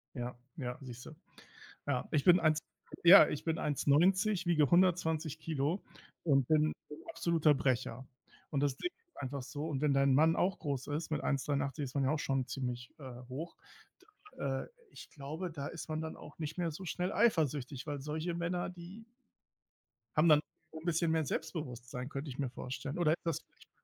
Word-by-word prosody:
Ja, 120 Hz, 0 st, -4 dB, 0.2 s
ja, 125 Hz, -4 st, -4 dB
siehst 125 Hz, -2 st, -9 dB
du. -, -, -9 dB, 0.8 s
Ja, 135 Hz, -3 st, 0 dB
ich 145 Hz, -3 st, +2 dB
bin 180 Hz, 0 st, +7 dB
1, 155 Hz, -1 st, +3 dB, 0.4 s
ja 180 Hz, +4 st, +10 dB
ich 150 Hz, -, -3 dB
bin 165 Hz, -1 st, 0 dB
1,90, 175 Hz, +7 st, +3 dB
wiege 155 Hz, -5 st, +3 dB
120 170 Hz, -4 st, +2 dB
Kilo 160 Hz, +4 st, -1 dB, 0.4 s
und 135 Hz, -6 st, +3 dB
bin 155 Hz, -1 st, +3 dB, 0.2 s
'n 150 Hz, -, -9 dB
absoluter 165 Hz, -, +3 dB
Brecher. 130 Hz, -2 st, -1 dB, 0.4 s
Und 140 Hz, -, 0 dB
das 140 Hz, -2 st, +1 dB
Ding 355 Hz, -, -2 dB, 0.2 s
ist 350 Hz, -, -28 dB
einfach 135 Hz, 0 st, -4 dB
so 145 Hz, +4 st, -5 dB
und 145 Hz, -3 st, -2 dB
wenn 150 Hz, -2 st, +3 dB
dein 135 Hz, 0 st, +4 dB
Mann 160 Hz, +4 st, +5 dB
auch 185 Hz, +1 st, +1 dB
groß 140 Hz, -5 st, -3 dB
ist, 155 Hz, +3 st, -3 dB
mit 155 Hz, -, 0 dB
1,83 140 Hz, +1 st, -1 dB
ist 130 Hz, +1 st, -9 dB
man 140 Hz, -, +2 dB
ja 135 Hz, -, +2 dB
auch 155 Hz, -, 0 dB
schon 135 Hz, -3 st, 0 dB
ziemlich, 125 Hz, -2 st, -4 dB
äh, 130 Hz, -3 st, -8 dB
hoch, 160 Hz, +6 st, -6 dB, 0.8 s
da, 135 Hz, -1 st, -1 dB
äh -, -, -12 dB, 0.2 s
ich -, -, -11 dB
glaube, 155 Hz, +5 st, -5 dB
da 140 Hz, -3 st, -5 dB
ist 165 Hz, -, -7 dB
man 155 Hz, 0 st, -2 dB
dann 160 Hz, -, -5 dB
auch 150 Hz, -, -12 dB
nicht 155 Hz, +1 st, -4 dB
mehr 170 Hz, -, +1 dB
so 185 Hz, +5 st, -8 dB
schnell 180 Hz, +2 st, -2 dB
eifersüchtig, 150 Hz, -, +1 dB
weil 145 Hz, -1 st, -3 dB
solche 155 Hz, +4 st, -3 dB
Männer, 175 Hz, +1 st, -1 dB
die 180 Hz, +5 st, -10 dB, 1.1 s
haben 155 Hz, +2 st, +5 dB
dann 150 Hz, -, +8 dB, 0.3 s
auch 160 Hz, -, -7 dB
'n 160 Hz, -, -13 dB
bisschen 170 Hz, -1 st, +2 dB
mehr 160 Hz, -1 st, +2 dB
Selbstbewusstsein, 130 Hz, -5 st, -4 dB
könnte 140 Hz, +1 st, -5 dB
ich 130 Hz, -, -8 dB
mir 135 Hz, -3 st, 0 dB
vorstellen. 135 Hz, +4 st, -5 dB
Oder 170 Hz, -3 st, +3 dB
ist 170 Hz, -, -6 dB
das 165 Hz, -3 st, 0 dB
vielleicht? -, -, -24 dB
150 Hz, 190 wpm, -33 LUFS, 135-165 Hz, 1.1 s, ja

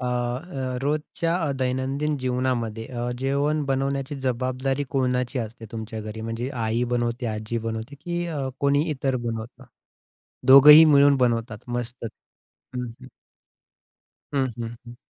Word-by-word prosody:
अ, 125 Hz, -, -3 dB
अ, 125 Hz, +2 st, -2 dB
रोजच्या 155 Hz, +3 st, -1 dB
अ, -, -, 0 dB
दैनंदिन 130 Hz, +4 st, -1 dB
जीवनामध्ये 125 Hz, -3 st, -1 dB
अ, 120 Hz, -1 st, -4 dB
जेवण 140 Hz, +3 st, 0 dB
बनवण्याची 135 Hz, +1 st, -1 dB
जबाबदारी 130 Hz, +2 st, -1 dB
कोणाची 125 Hz, -1 st, 0 dB
असते 115 Hz, 0 st, -6 dB
तुमच्या 110 Hz, 0 st, -5 dB
घरी 110 Hz, +1 st, -7 dB
म्हणजे 115 Hz, +3 st, -3 dB, 0.2 s
आई 115 Hz, +2 st, 0 dB
बनवते, 120 Hz, +1 st, -1 dB
आजी 110 Hz, +1 st, -3 dB
बनवते, 110 Hz, +5 st, -4 dB
की 175 Hz, 0 st, -2 dB
अ, 145 Hz, -5 st, -3 dB
कोणी 140 Hz, +1 st, +3 dB
इतर 135 Hz, -2 st, -1 dB
बनवतं? 115 Hz, 0 st, -5 dB, 0.8 s
दोघंही 150 Hz, +4 st, +10 dB
मिळून 145 Hz, -2 st, +6 dB
बनवतात 115 Hz, -3 st, 0 dB
मस्तच 120 Hz, -1 st, -4 dB, 0.7 s
हं 125 Hz, -, -2 dB, 0.2 s
हं. 130 Hz, -, -12 dB, 1.3 s
हं, 135 Hz, -1 st, +2 dB
हं, 115 Hz, 0 st, -5 dB
हं. 120 Hz, 0 st, -10 dB
130 Hz, 130 wpm, -24 LUFS, 120-140 Hz, 1.3 s, दोघंही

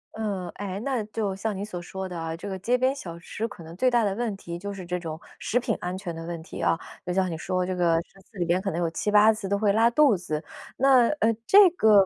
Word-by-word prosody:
呃， 200 Hz, -5 st, -3 dB
诶？ 195 Hz, -1 st, -4 dB
那 260 Hz, -5 st, 0 dB
就 210 Hz, -2 st, -2 dB
像 205 Hz, +1 st, -3 dB
你 200 Hz, -, -3 dB
所 180 Hz, -4 st, -6 dB
说 190 Hz, +2 st, -6 dB
的 180 Hz, -2 st, -6 dB
啊， 165 Hz, 0 st, -3 dB
这 185 Hz, -, -7 dB
个 190 Hz, -1 st, -3 dB
街 240 Hz, +7 st, +2 dB
边 260 Hz, +2 st, +2 dB
小 170 Hz, -11 st, -7 dB
吃 210 Hz, +6 st, -4 dB
可 190 Hz, -6 st, -11 dB
能 165 Hz, +1 st, -10 dB
最 255 Hz, +8 st, +3 dB
大 240 Hz, -2 st, +3 dB
的 200 Hz, -2 st, +1 dB
问 225 Hz, -1 st, -2 dB
题 170 Hz, -2 st, -7 dB
就 200 Hz, +2 st, -5 dB
是 195 Hz, -2 st, -7 dB
这 180 Hz, +1 st, -2 dB
种 160 Hz, -2 st, -6 dB, 0.2 s
食 245 Hz, -, +1 dB
品 230 Hz, -3 st, -1 dB
安 180 Hz, +1 st, -3 dB
全 180 Hz, -3 st, -5 dB
的 165 Hz, -, -6 dB
问 170 Hz, -1 st, -5 dB
题 -, -, -8 dB
啊。 165 Hz, -, +2 dB, 0.3 s
就 180 Hz, -, -3 dB
像 185 Hz, 0 st, +1 dB
你 -, -, -3 dB
说 185 Hz, +3 st, -2 dB
的 -, -, 0 dB
这 185 Hz, 0 st, -2 dB
个 170 Hz, -2 st, +3 dB
10 195 Hz, -, -22 dB
次 200 Hz, -, -18 dB
里 175 Hz, -, 0 dB
边 175 Hz, +2 st, +1 dB
可 195 Hz, -, -2 dB
能 170 Hz, -, -2 dB
有 170 Hz, -, +1 dB
7-8 210 Hz, +5 st, +4 dB
次 205 Hz, -3 st, -5 dB
都 200 Hz, -, +2 dB
会 205 Hz, -1 st, +2 dB
拉 225 Hz, +2 st, +5 dB
肚 270 Hz, -1 st, +5 dB
子。 155 Hz, -4 st, -4 dB, 0.3 s
那， 260 Hz, -2 st, +5 dB
呃， 230 Hz, -2 st, +3 dB
这 400 Hz, 0 st, +9 dB
个 215 Hz, -, +5 dB
195 Hz, 290 characters per minute, -26 LUFS, 175-220 Hz, 0.3 s, 这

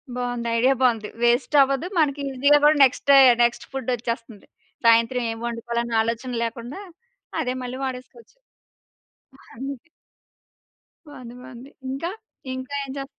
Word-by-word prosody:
బావుంది. 245 Hz, -1 st, -3 dB
ఐడియా 260 Hz, +3 st, +4 dB
బావుంది. 225 Hz, -4 st, +1 dB
వేస్ట్ 240 Hz, +5 st, +2 dB
అవ్వదు 275 Hz, +5 st, +1 dB
మనకి 285 Hz, -2 st, +1 dB
ఈజీ‌గా 285 Hz, +3 st, +4 dB
గూడా 300 Hz, +1 st, +6 dB
నెక్స్ట్ 260 Hz, -, +2 dB
డే 275 Hz, -, +8 dB, 0.3 s
నెక్స్ట్ 240 Hz, 0 st, 0 dB
ఫు‌డ్ 265 Hz, -2 st, -5 dB
ఒచ్చేస్తంది. 230 Hz, -2 st, -6 dB, 0.4 s
సాయంత్రం 230 Hz, +2 st, +4 dB
ఏం 225 Hz, -, -6 dB
వండుకోవాలన్న 235 Hz, 0 st, -3 dB
ఆలోచన 230 Hz, +3 st, -3 dB
లేకుండా 235 Hz, -, -6 dB, 0.6 s
అదే 250 Hz, 0 st, -2 dB
మళ్ళీ 250 Hz, +1 st, -6 dB
వాడేసుకోవచ్చు. 255 Hz, -, -8 dB, 1.2 s
అంతే. 270 Hz, +3 st, -7 dB, 1.2 s
బావుంది 245 Hz, -4 st, -11 dB
బావుంది. 255 Hz, +2 st, -12 dB, 0.2 s
ఇంకా? 330 Hz, +7 st, -3 dB, 0.4 s
ఇంకా 260 Hz, +2 st, -7 dB
ఏం 275 Hz, -, -9 dB
చే 275 Hz, -, -4 dB
250 Hz, 125 wpm, -23 LUFS, 235-270 Hz, 1.2 s, డే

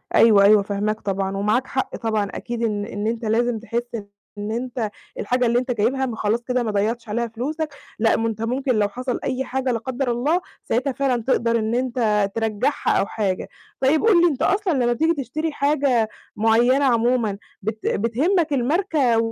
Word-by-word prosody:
أيوه، 210 Hz, -3 st, +6 dB
أيوه، 210 Hz, +1 st, +6 dB
فاهماك 210 Hz, +2 st, -2 dB
طبعًا 195 Hz, 0 st, -2 dB
ومعاك 215 Hz, +6 st, +1 dB
حق 265 Hz, -, -2 dB
طبعًا 220 Hz, -2 st, -1 dB
أكيد 235 Hz, -1 st, -4 dB
إن 210 Hz, -2 st, -1 dB
إن 205 Hz, -1 st, -4 dB
أنت 230 Hz, 0 st, -2 dB
لازم 230 Hz, +1 st, +1 dB
تحِس 235 Hz, +1 st, -2 dB, 0.5 s
إن 205 Hz, +1 st, -4 dB
أنت 240 Hz, -2 st, -3 dB, 0.3 s
الحاجة 250 Hz, +4 st, +1 dB
اللي 235 Hz, +1 st, +3 dB
أنت 255 Hz, 0 st, -3 dB
جايبها 245 Hz, +4 st, +1 dB
ما 240 Hz, -, -4 dB
خلاص 220 Hz, +2 st, 0 dB
كده 250 Hz, 0 st, 0 dB
ما 220 Hz, -, -1 dB
ضيّعتش 220 Hz, +3 st, -1 dB
عليها 235 Hz, +3 st, -1 dB
فلوسك، 285 Hz, +7 st, -4 dB, 0.3 s
لأ، 225 Hz, 0 st, +3 dB
ما 225 Hz, -, 0 dB
أنت 220 Hz, -1 st, -4 dB
ممكن 255 Hz, +2 st, 0 dB
لو 205 Hz, -1 st, +2 dB
حصل 250 Hz, +3 st, -3 dB
أي 260 Hz, +1 st, -1 dB
حاجة 260 Hz, 0 st, -1 dB
لا 230 Hz, -, -1 dB
قدَّر 260 Hz, +1 st, -2 dB
الله، 290 Hz, +10 st, +1 dB, 0.2 s
ساعتها 260 Hz, +4 st, 0 dB
فعلًا 255 Hz, -3 st, 0 dB
تقدر 230 Hz, -2 st, +1 dB
إن 220 Hz, +1 st, -1 dB
أنت 230 Hz, -5 st, +1 dB
ترجّعها 225 Hz, +4 st, 0 dB
أو -, -, +2 dB
حاجة. 200 Hz, -3 st, -2 dB, 0.3 s
طيب 280 Hz, +4 st, +3 dB
قُل 400 Hz, -7 st, +5 dB
لي 350 Hz, -, +6 dB
أنت 290 Hz, -6 st, -2 dB
أصلًا 390 Hz, -2 st, +2 dB
لمّا 245 Hz, -3 st, +2 dB
بتيجي 320 Hz, +6 st, +2 dB
تشتري 310 Hz, +2 st, -3 dB
حاجة 275 Hz, -6 st, +1 dB, 0.3 s
معيّنة 240 Hz, +5 st, +3 dB
عمومًا 235 Hz, -4 st, +2 dB, 0.2 s
بت 220 Hz, +2 st, -3 dB
بتهمّك 295 Hz, -, +1 dB
الماركة 280 Hz, -2 st, +2 dB
235 Hz, 185 wpm, -22 LUFS, 220-265 Hz, 0.5 s, أيوه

